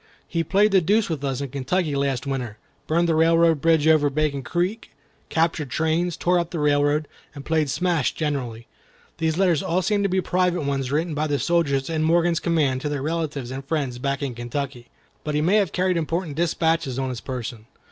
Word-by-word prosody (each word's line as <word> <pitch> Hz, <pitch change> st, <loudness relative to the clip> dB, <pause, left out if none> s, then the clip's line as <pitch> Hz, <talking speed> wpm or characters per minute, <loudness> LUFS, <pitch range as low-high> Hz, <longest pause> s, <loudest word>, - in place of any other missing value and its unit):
He 165 Hz, -2 st, -1 dB
played 200 Hz, +6 st, +3 dB
the 190 Hz, -1 st, +5 dB
deuce 205 Hz, +3 st, +2 dB
with 150 Hz, -3 st, -3 dB
us 135 Hz, -1 st, -2 dB
in 140 Hz, -, -4 dB
Kentucky 145 Hz, +4 st, -1 dB
last 140 Hz, -2 st, -1 dB
winter: 125 Hz, -6 st, -3 dB, 0.3 s
burned 170 Hz, +2 st, +2 dB
the 165 Hz, -, +2 dB
railroad 165 Hz, -1 st, +4 dB
bridge 160 Hz, -2 st, +3 dB
over 155 Hz, -2 st, +5 dB
Bacon 140 Hz, -1 st, -1 dB
Creek, 175 Hz, -, -2 dB, 0.4 s
captured 160 Hz, -3 st, 0 dB
trains, 160 Hz, +5 st, 0 dB
tore 180 Hz, 0 st, +2 dB
up 170 Hz, -1 st, -2 dB
the 175 Hz, -, -5 dB
railroad, 145 Hz, 0 st, +2 dB, 0.3 s
and 140 Hz, -1 st, -9 dB
played 155 Hz, -3 st, +1 dB
smash 170 Hz, -1 st, +1 dB
generally. 130 Hz, -7 st, -3 dB, 0.5 s
These 160 Hz, 0 st, 0 dB
letters 180 Hz, -5 st, +3 dB
all 180 Hz, +2 st, 0 dB
seem 205 Hz, +1 st, +1 dB
to 200 Hz, -, +1 dB
be 190 Hz, +1 st, +1 dB
private 180 Hz, -2 st, 0 dB
ones 135 Hz, -2 st, -2 dB
written 160 Hz, +3 st, 0 dB
by 150 Hz, +1 st, -1 dB
the 145 Hz, -1 st, 0 dB
soldiers 140 Hz, -5 st, +1 dB
in 160 Hz, -1 st, -1 dB
Morgan's 170 Hz, +1 st, +2 dB
command 145 Hz, -6 st, +1 dB
to 150 Hz, -, -2 dB
their 145 Hz, -2 st, -3 dB
relatives 150 Hz, -5 st, -3 dB
and 135 Hz, +1 st, -5 dB
friends 135 Hz, -4 st, -2 dB
back 140 Hz, +1 st, -2 dB
in 135 Hz, -3 st, -2 dB
Kentucky. 120 Hz, +1 st, -5 dB, 0.4 s
But 150 Hz, -2 st, -2 dB
he 150 Hz, -, +2 dB
may 185 Hz, +7 st, +3 dB
have 195 Hz, -7 st, +1 dB
carried 185 Hz, -1 st, +1 dB
important 165 Hz, -1 st, -2 dB
dispatches 160 Hz, -4 st, 0 dB
on 135 Hz, -1 st, -1 dB
his 125 Hz, -2 st, -5 dB
person. 120 Hz, -3 st, -6 dB
155 Hz, 200 wpm, -23 LUFS, 140-170 Hz, 0.5 s, the